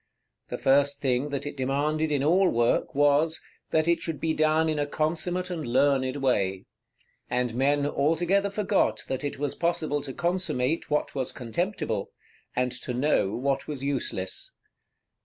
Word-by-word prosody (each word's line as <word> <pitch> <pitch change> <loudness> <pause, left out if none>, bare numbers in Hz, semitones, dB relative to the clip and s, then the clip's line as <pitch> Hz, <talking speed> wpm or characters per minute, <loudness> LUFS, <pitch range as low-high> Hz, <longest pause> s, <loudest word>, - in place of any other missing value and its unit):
The - - -3
first 140 +1 +3
thing 130 +1 0
that 140 -1 -3
it 145 - -5
demanded 145 +4 0
in 140 -2 +1
all 180 +5 +4
work 120 +3 +1
was, 145 +3 +3 0.3
that 155 0 +2
it 170 0 +2
should 160 -4 -3
be 160 +1 0
done 155 +1 +2
in 155 -1 0
a 145 - 0
consummate 175 +5 -1
and 165 -3 -3
learned 130 +1 +2
way; 100 -9 0 0.6
and 125 -1 0
men 140 +3 +2
altogether 175 +8 +1
forgot 200 -1 +1
that 130 +2 -3
it 145 - -3
was 145 0 -2
possible 160 -4 0
to 140 - -6
consummate 165 -3 -1
what 150 0 0
was 130 -3 -2
contemptible, 120 - -2 0.5
and 125 0 +1
to 125 - -4
know 125 -7 +1
what 135 +2 -1
was 145 -3 -5
useless. 115 -9 -2
145 Hz, 155 wpm, -27 LUFS, 130-160 Hz, 0.6 s, all